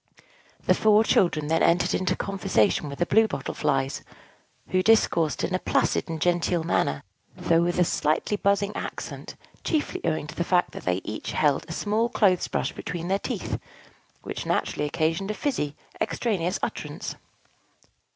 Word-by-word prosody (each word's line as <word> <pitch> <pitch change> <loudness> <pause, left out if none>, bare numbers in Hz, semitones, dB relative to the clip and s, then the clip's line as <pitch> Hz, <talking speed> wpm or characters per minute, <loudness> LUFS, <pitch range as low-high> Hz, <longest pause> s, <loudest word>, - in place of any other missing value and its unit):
The - - +5
four 215 0 +4
children 170 -8 +2
then 160 +2 +1
entered 175 +1 +3
into 185 - +1
conversation 165 - +1
with 140 - -7
the 175 - +1
Blue 220 +5 +4
Bottle 135 - -4
Flies, 135 0 0 0.7
who 185 - +2
discoursed 185 -7 +3
in 185 - -1
a 185 - +1
placid - - +1
and 160 -1 -3
genteel 175 0 +1
manner, 70 - 0 0.3
though 165 0 +3
with 175 +1 0
a 180 - +5
slightly 155 +4 0
buzzing 200 0 +1
accent, - - -6 0.3
chiefly 310 -3 -1
owing 160 -2 0
to 155 - -8
the 170 - -1
fact 180 0 +2
that - - -9
they 90 +1 0
each 110 - -5
held 145 -1 +1
a - - -8
small 215 +6 0
clothes 195 -7 +2
brush - - -1
between 170 +1 -5
their 195 +1 +2
teeth, - - -3 0.6
which - - -5
naturally 150 - 0
occasioned 165 +5 -1
a 215 - -2
fizzy, 150 - -2 0.3
extraneous 190 -5 0
utterance. - - -4
175 Hz, 160 wpm, -26 LUFS, 155-200 Hz, 0.7 s, The